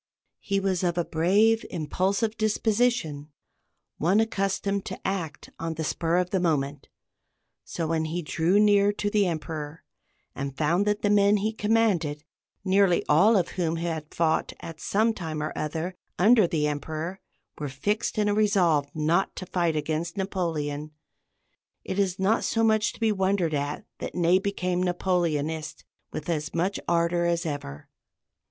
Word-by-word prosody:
He 195 Hz, 0 st, -1 dB
was 190 Hz, -2 st, 0 dB
of 175 Hz, -1 st, 0 dB
a 175 Hz, -, +1 dB
brave, 205 Hz, +8 st, +3 dB
impulsive 190 Hz, +7 st, -1 dB
disposition, 215 Hz, -8 st, 0 dB, 0.7 s
one 185 Hz, +7 st, +3 dB
accustomed 200 Hz, -2 st, 0 dB
to 185 Hz, -, -6 dB
act 170 Hz, -6 st, -4 dB
on 165 Hz, 0 st, -3 dB
the 160 Hz, -, -3 dB
spur 165 Hz, +2 st, 0 dB
of 180 Hz, 0 st, 0 dB
the 190 Hz, -, +1 dB
moment; 145 Hz, -5 st, -1 dB, 0.8 s
so, 165 Hz, -, -4 dB
when 160 Hz, 0 st, 0 dB
he 170 Hz, +2 st, -3 dB
drew 165 Hz, +6 st, +2 dB
near 205 Hz, -1 st, +5 dB
to 205 Hz, 0 st, -2 dB
the 205 Hz, -2 st, +3 dB
Emperor, 155 Hz, -2 st, -5 dB, 0.5 s
and 135 Hz, 0 st, -5 dB
found 170 Hz, +6 st, +1 dB
that 210 Hz, 0 st, 0 dB
the 205 Hz, -, +3 dB
men 205 Hz, 0 st, +5 dB
he 215 Hz, +2 st, -1 dB
commanded, 210 Hz, -9 st, +1 dB, 0.4 s
nearly 190 Hz, -2 st, +3 dB
all 200 Hz, +9 st, +5 dB
of 180 Hz, -, 0 dB
whom 170 Hz, -3 st, -1 dB
had 165 Hz, -2 st, -4 dB
fought 160 Hz, -1 st, 0 dB
at 165 Hz, -1 st, -9 dB
some 220 Hz, +3 st, +2 dB
time 160 Hz, -6 st, -5 dB
or 150 Hz, +1 st, -3 dB
other 160 Hz, +4 st, -3 dB, 0.2 s
under 215 Hz, 0 st, +5 dB
the 155 Hz, -3 st, 0 dB
Emperor, 155 Hz, +5 st, -3 dB, 0.4 s
were 145 Hz, -2 st, -3 dB
fixed 205 Hz, -, -2 dB
in 210 Hz, -1 st, +2 dB
a 205 Hz, -, +2 dB
resolve 180 Hz, -9 st, +2 dB
not 160 Hz, +5 st, +1 dB
to 185 Hz, -, -6 dB
fight 170 Hz, -3 st, 0 dB
against 160 Hz, +3 st, -2 dB
Napoleon, 155 Hz, -6 st, -2 dB, 0.9 s
it 190 Hz, -, -3 dB
is 190 Hz, -2 st, +1 dB
not 200 Hz, +4 st, +2 dB
so 225 Hz, -, +1 dB
much 220 Hz, 0 st, +3 dB
to -, -, -15 dB
be 225 Hz, -2 st, +2 dB
wondered 190 Hz, -4 st, +1 dB
at 145 Hz, 0 st, -2 dB
that -, -, -6 dB
Ney 175 Hz, +1 st, +4 dB
became 185 Hz, -2 st, -1 dB
Napoleonist 170 Hz, -4 st, -1 dB, 0.3 s
with 150 Hz, -, -6 dB
as 155 Hz, -3 st, -2 dB
much 185 Hz, +4 st, 0 dB
ardor 170 Hz, 0 st, +2 dB
as 170 Hz, 0 st, 0 dB
ever. 145 Hz, -, -5 dB
175 Hz, 160 wpm, -26 LUFS, 160-200 Hz, 0.9 s, near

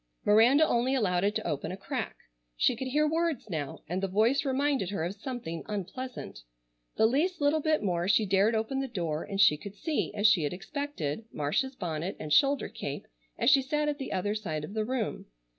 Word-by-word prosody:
Miranda 245 Hz, +9 st, +6 dB
only 250 Hz, +3 st, +1 dB
allowed 180 Hz, -7 st, +1 dB
it 205 Hz, +1 st, +1 dB
to -, -, -2 dB
open 145 Hz, -, -2 dB
a 185 Hz, -, -5 dB
crack. -, -, -4 dB, 0.4 s
She -, -, +3 dB
could 260 Hz, +3 st, -4 dB
hear 300 Hz, +4 st, +2 dB
words 320 Hz, -8 st, -1 dB
now, 145 Hz, -4 st, -4 dB
and 180 Hz, +4 st, -2 dB
the 195 Hz, -, 0 dB
voice 220 Hz, +9 st, +2 dB
reminded 270 Hz, -6 st, 0 dB
her 195 Hz, -5 st, -2 dB
of 175 Hz, +3 st, -2 dB
something 205 Hz, -7 st, -5 dB
unpleasant. 210 Hz, -, -5 dB, 0.6 s
The 220 Hz, -, +5 dB
least 315 Hz, +10 st, +1 dB
little 290 Hz, +2 st, +3 dB
bit 310 Hz, -2 st, +1 dB
more 175 Hz, -3 st, 0 dB
she 210 Hz, +2 st, +4 dB
dared 200 Hz, +4 st, +3 dB
open 220 Hz, +5 st, -1 dB
the 270 Hz, -, -2 dB
door, 170 Hz, -9 st, -2 dB
and 195 Hz, -, -5 dB
she 190 Hz, -7 st, +6 dB
could 200 Hz, +5 st, -9 dB
see, 310 Hz, +8 st, -2 dB
as 205 Hz, -, -1 dB
she 210 Hz, -5 st, +6 dB
had 145 Hz, +1 st, -1 dB
expected, 225 Hz, -, -4 dB
Marcia's 155 Hz, -, -1 dB
bonnet 175 Hz, -2 st, -3 dB
and 150 Hz, -, -2 dB
shoulder 280 Hz, 0 st, +4 dB
cape 140 Hz, 0 st, -6 dB, 0.3 s
as -, -, +4 dB
she 275 Hz, -, +6 dB
sat 300 Hz, +3 st, -1 dB
at 295 Hz, 0 st, -1 dB
the 270 Hz, -, -5 dB
other 205 Hz, +3 st, 0 dB
side 170 Hz, -8 st, -3 dB
of 155 Hz, -, -7 dB
the 215 Hz, -1 st, -1 dB
room. 245 Hz, -2 st, -3 dB
215 Hz, 210 wpm, -29 LUFS, 180-270 Hz, 0.6 s, Miranda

